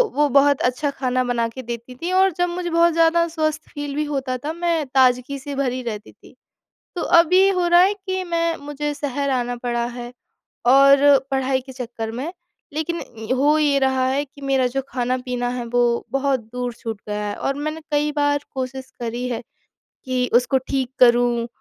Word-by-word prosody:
वो 295 +1 +3
बहुत 280 +1 +4
अच्छा 280 +3 -2
खाना 255 -2 -1
बना 235 -2 0
के 260 +3 -8
देती 235 +1 -7
थी 340 +8 -4
और 380 +1 +4
जब 355 0 +1
मुझे 350 0 -3
बहुत 335 0 +3
ज़्यादा 330 +1 +3
स्वस्थ 310 -1 -2
फील 290 -1 -5
भी 300 - 0
होता 270 -3 -2
था, 295 +6 -5
मैं 335 -3 0
ताजगी 255 +1 +2
से 280 +1 -6
भरी 255 -2 -1
रहती 215 -3 -6
थी। - - -20 0.6
तो - - -2 0.2
अब 335 0 -1
ये 380 +1 +6
हो 365 -2 +1
रहा 345 0 +6
है 390 +3 +3
कि 375 -2 -4
मैं 335 -1 0
मुझे 295 +1 -4
शहर 285 -1 -2
आना 245 -2 -1
पड़ा 240 -1 -2
है 240 0 -7 0.5
और 275 +2 +6
पढ़ाई 265 -1 0
के 265 +1 -12
चक्कर 235 -3 -5
में 270 +9 -4 0.4
लेकिन 325 +2 -2
अ, 225 +1 -5
हो 290 +4 +3
ये 290 -2 +3
रहा 265 -1 +2
है 275 +2 0
कि 285 0 -18
मेरा 270 -2 +2
जो 270 - 0
खाना-पीना 250 -1 -2
है 245 -1 -4
वो 240 0 +1
बहुत 275 -1 +1
दूर 250 -1 -3
छूट 225 -3 -6
गया 210 0 -3
है। 205 - -3
और 275 - -2
मैंने 310 +2 -4
कई 295 0 +1
बार 290 0 +2
कोशिश 260 0 -5
करी 240 +1 -3
है 240 -2 -3 0.6
कि 255 -2 -1
उसको 245 +2 +4
ठीक 265 -3 -1
करूँ 240 -1 +4
270 Hz, 195 wpm, -21 LUFS, 245-300 Hz, 0.6 s, ये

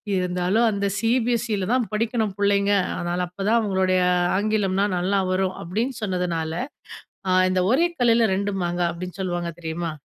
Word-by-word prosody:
இருந்தாலும் 180 +5 +1
அந்த 200 0 -2
"சிபிஎஸ்இல 230 -2 0
தான் 250 -2 +2
படிக்கணும் 220 -1 -1
புள்ளைங்க 200 0 +2 0.3
அதனால 175 +1 -2
அப்பதான் 200 +5 0
அவங்களுடைய 190 -3 +1 0.4
ஆங்கிலம்னா 205 -2 +1
நல்லா 190 +3 +1
வரும்" 185 0 0
அப்டின்னு 225 +10 -2
சொன்னதுனால 180 -4 -1 0.8
ஆ - - +3 0.2
இந்த 185 0 +1
"ஒரே 325 +8 +4
கல்லுல 235 -1 +4
2 200 +1 -1
மாங்கா" 175 0 -1
அப்டின்னு 180 +2 -8
சொல்வாங்க 175 -2 -2
தெரியுமா? 165 0 -3
195 Hz, 135 wpm, -23 LUFS, 180-220 Hz, 0.8 s, ஒரே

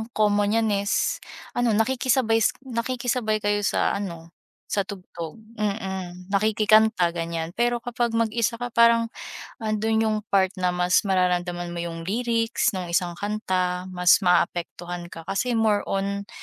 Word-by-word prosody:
common 205 -1 +3
niyan 225 -1 +2 0.2
is - - +1 0.3
ano, 240 -3 +1
nakikisabay 240 0 +2
s 220 - +2
nakikisabay 245 -3 -1
kayo 205 0 +2
sa - - +1
ano 170 -4 -7 0.4
sa 200 -2 0
tugtog. 175 -5 -7 0.2
Mm, 190 -3 -4
nakikikanta 215 -2 +4
ganyan. 165 -1 -3
Pero 240 +2 +1
kapag 240 -1 -1
mag-isa 230 0 +1
ka 245 +1 -5
parang 230 0 +4 0.5
ando'n 220 -1 0
'yung 215 -1 +1
part 190 -1 +3
na 180 - +2
mas 180 0 +3
mararamdaman 180 -2 0
mo 170 - -4
'yung 165 -1 -5
lyrics 230 +2 0
'nung 180 -2 -4
isang 175 -1 0
kanta. 185 -3 -2
Mas 180 +1 +4
maapektuhan 175 -1 0
ka 165 -1 -10
kasi 235 +6 -1
more 215 -2 +3
on 200 +1 -2
205 Hz, 140 wpm, -24 LUFS, 180-225 Hz, 0.5 s, nakikikanta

